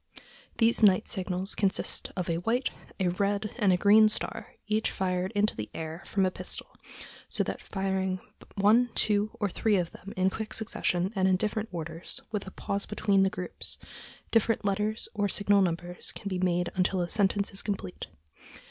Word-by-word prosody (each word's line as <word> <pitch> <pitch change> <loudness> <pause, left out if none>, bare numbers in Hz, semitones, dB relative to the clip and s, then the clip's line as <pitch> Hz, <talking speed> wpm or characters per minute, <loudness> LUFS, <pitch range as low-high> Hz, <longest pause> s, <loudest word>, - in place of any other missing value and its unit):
These 230 0 +3
night 200 -1 +5
signals 190 -1 -2
"consist 195 -2 -1
of 180 -2 -2
a 165 - 0
white, 235 +9 0 0.3
a 185 -2 +2
red, 200 +3 -1
and 205 -4 +4
a 180 - +4
green 215 +3 +7
star, 215 - -4
each 215 +1 +1
fired 185 0 -1
into 205 +1 +2
the 105 -1 -5
air 160 +2 -5
from 195 -1 +2
a 185 - +1
pistol, - - -4 0.5
so - - +1
that - - -4
by 190 -2 -3
firing 190 -1 0 0.4
one, 220 +5 +4
two, 210 0 +2
or 205 - +1
three 210 +3 +1
of 175 -3 0
them 195 - -10
in 185 +1 +3
quick 220 +1 -4
succession 190 -3 -1
and 190 -1 +3
in 185 - +4
different 215 +2 -1
orders, 165 0 -5
with 210 -3 -3
a - - -4
pause 200 +1 -3
between 200 -2 +2
the 195 - +4
groups, 180 -1 -5 0.5
different 225 -1 +2
letters 210 +2 0
or 205 -2 0
signal 205 +1 +3
numbers 175 0 -1
can 200 - -6
be 185 -2 -2
made 180 -1 +1
until 185 0 +1
a 175 - 0
sentence 200 +1 +2
is 195 - +2
complete." 200 -3 -4
195 Hz, 185 wpm, -29 LUFS, 185-210 Hz, 0.5 s, green